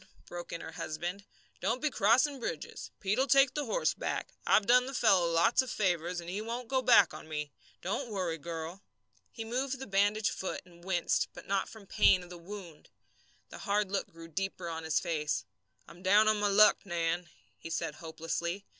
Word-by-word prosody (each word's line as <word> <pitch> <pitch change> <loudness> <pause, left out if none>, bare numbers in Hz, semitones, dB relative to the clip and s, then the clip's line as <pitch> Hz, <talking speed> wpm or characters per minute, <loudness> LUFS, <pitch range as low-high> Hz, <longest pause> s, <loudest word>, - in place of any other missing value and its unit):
broke 175 0 -8
in 170 - -5
her 160 - -7
husband, 175 +5 -5 0.3
"don't 225 +7 0
be 300 +1 0
crossing 255 +7 +3
bridges. 165 -10 -5
Pete'll 210 +8 +1
take 275 0 +5
the 295 -1 -2
horse - - +1
back. - - -4
I've 215 - +5
done 250 +2 +5
the 270 - -5
fellow 190 -8 +4
lots 170 +10 +4
of 260 - -6
favours, 180 -4 0
and 170 - -8
he 190 +4 -3
won't 235 +2 -5
go 265 -1 +2
back 230 -7 +6
on - - -9
me. 150 -2 -4 0.3
Don't 230 +8 -2
worry, 180 -6 -2
girl!" 165 +3 -6 0.5
He 225 - -6
moved 260 +4 -2
the 265 - -7
bandaged 205 +1 +2
foot 190 - -4
and 170 -1 -18
winced, 180 -2 +1
but - - -10
not 195 0 0
from 220 -2 -12
the 195 - -15
pain 185 -1 +5
of 175 - -13
the 175 - -9
wound. 175 -3 -10 0.6
The - - -10
hard 205 -1 0
look 200 - -1
grew 165 0 -12
deeper 185 +1 -4
on 165 -1 -5
his 160 - +2
face. 150 - -2 0.4
"I'm 175 - -14
down 205 +3 +5
on 215 -1 +3
my 205 - +2
luck, 210 +1 +6
Nan," 170 -2 -1 0.3
he - - -8
said, 165 -1 -2
hopelessly. 170 +4 -4
195 Hz, 200 wpm, -31 LUFS, 170-220 Hz, 0.6 s, back